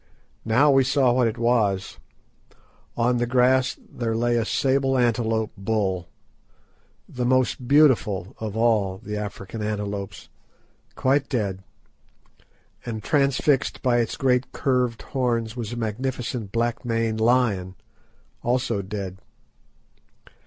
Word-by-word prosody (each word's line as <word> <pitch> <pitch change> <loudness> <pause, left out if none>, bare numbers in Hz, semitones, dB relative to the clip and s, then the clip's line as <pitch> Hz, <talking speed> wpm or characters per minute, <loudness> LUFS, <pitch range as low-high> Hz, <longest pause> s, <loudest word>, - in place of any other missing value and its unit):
Now 130 +7 +4
we 135 -1 +5
saw 130 -1 +3
what 125 -1 +3
it 115 +1 -3
was. 115 -5 0 1.0
On 120 +1 +2
the 120 0 0
grass 130 +1 +3
there 115 -2 -3
lay 120 +1 +1
a 115 -2 +1
sable 135 +1 +1
antelope 115 -2 +1
bull—the 95 -4 -1 1.2
most 130 0 +1
beautiful 120 - +3
of 110 -1 -4
all 110 -5 +2
the 105 +2 -6
African 105 +1 -6
antelopes—quite 105 +6 -4
dead, 100 -7 -2 1.2
and 110 -3 -5
transfixed 140 0 +1
by 125 -2 +3
its 115 - -1
great 125 -1 +1
curved 125 -4 0
horns 115 -4 -1
was 115 -3 -5
a 120 - -5
magnificent 120 -1 -3
black 115 +1 -1
maned 115 -2 -1
lion, 110 -6 +2 0.7
also 120 -4 0
dead. 95 -1 -6
115 Hz, 110 wpm, -24 LUFS, 105-125 Hz, 1.2 s, we